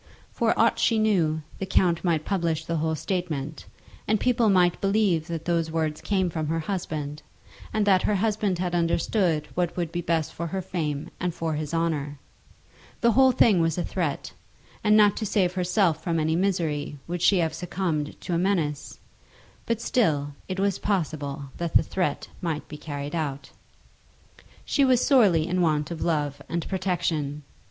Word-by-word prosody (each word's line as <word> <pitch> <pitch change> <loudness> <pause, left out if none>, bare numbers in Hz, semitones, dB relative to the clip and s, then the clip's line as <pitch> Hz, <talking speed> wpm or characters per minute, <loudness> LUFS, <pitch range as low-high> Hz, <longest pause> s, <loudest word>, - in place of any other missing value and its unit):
For - - +1
aught - - +3
she 230 - +3
knew, 170 -8 +2 0.2
the 190 - -3
count 175 -2 +2
might 165 -4 +1
publish 165 -5 -1
the 170 -1 -1
whole 160 +1 0
statement, 155 -4 -3 0.4
and 215 0 +2
people 240 -2 +2
might 180 -3 +3
believe 195 -5 +2
that 165 -2 -5
those 170 -2 0
words 160 -1 -2
came 190 -3 0
from 155 -2 -2
her 165 +1 -1
husband, 155 -5 -4 0.5
and 215 -1 +1
that 190 -2 +4
her 210 - +1
husband 205 -2 0
had 180 0 -2
understood 170 -1 +1
what 175 -1 -1
would 170 -2 -2
be 175 - -2
best 165 -2 -1
for 170 - -4
her 190 +4 -3
fame 150 -6 -3
and 180 -2 -2
for 165 -1 -2
his 150 -1 -3
honour. 155 -4 -1 0.8
The 235 - +5
whole 260 +3 +5
thing 220 -7 +4
was 165 0 +1
a 175 - 0
threat, 165 -7 -3 0.5
and 210 0 +5
not 205 -2 +5
to 220 - -2
save 185 -3 +1
herself 180 -2 +1
from 165 -2 0
any 160 +1 +1
misery, 165 -6 -1
would 175 0 -3
she 195 - +5
have 165 -3 +1
succumbed 165 -3 -3
to 180 - -4
a 170 - +2
menace; 160 -6 -1 0.7
but 230 -1 0
still 150 - +1
it 185 0 -4
was 200 -1 +1
possible 145 -8 -2
that 170 -1 -4
the - - +6
threat 180 -6 -2
might 160 -4 -3
be 150 - -8
carried 145 -1 -6
out. 140 -4 -3 1.1
She 280 - +2
was 255 -2 +4
sorely 200 - +4
in 180 +1 0
want 155 -2 +1
of 165 - -5
love 145 -4 -1
and 170 0 -2
protection. 165 -6 -1
170 Hz, 175 wpm, -26 LUFS, 155-190 Hz, 1.1 s, the